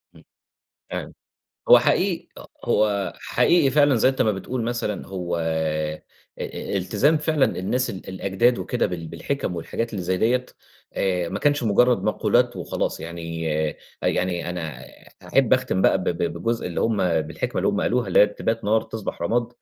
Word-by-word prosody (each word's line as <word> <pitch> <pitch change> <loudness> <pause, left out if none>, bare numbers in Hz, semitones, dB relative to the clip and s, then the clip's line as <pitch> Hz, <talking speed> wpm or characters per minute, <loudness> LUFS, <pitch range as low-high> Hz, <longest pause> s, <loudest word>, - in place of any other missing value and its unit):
إمم، - - -17 0.7
تمام - - -5 0.6
هو - - +10
حقيق 185 -3 +1
أ - - -10 0.2
هو 105 -2 +1
حقيقي 165 -6 +3
فعلًا 145 0 +4
زي 120 +3 +4
أنت 135 - -1
ما 110 - +3
بتقول 115 +5 -4
مثلًا، 115 -3 -3
هو 90 -3 -3
أ 80 -1 -1 0.4
التزام 100 - 0
فعلًا 150 -2 +2
الناس 125 +7 0
ال 95 - -7
الأجداد 100 +6 +1
وكده 125 - 0
بال 85 -4 -4
بالحِكَم 90 - -3
والحاجات 115 +7 -3
اللي 100 - -3
زي 95 +1 0
ديَّة، 125 +5 +2 0.5
آآ، 90 -3 0
ما 100 - -3
كانش 145 0 +2
مُجرَّد 120 +3 +3
مقولات - - +2
وخلاص، - - -3
يعني 85 -1 -4 0.5
أ - - +2
يعني 90 -1 -1
أنا 80 -7 -5 0.4
أحب - - +3
أختم 95 - +1
بقى - - +4
ب 95 - -4
ب 85 -1 -1
بجزء 115 +7 -2
اللي 85 - -3
هم 110 -2 +1 0.2
بالحكمة 80 +2 -4
اللي - - +1
هم - - +1
قالوها، 125 0 +1
اللي - - +4
هي - - +9
بتبات 110 +2 -3
نار 110 +2 +3
تصبح 110 -6 -6
رماد، 115 +7 +1
100 Hz, 170 wpm, -23 LUFS, 85-120 Hz, 0.7 s, هو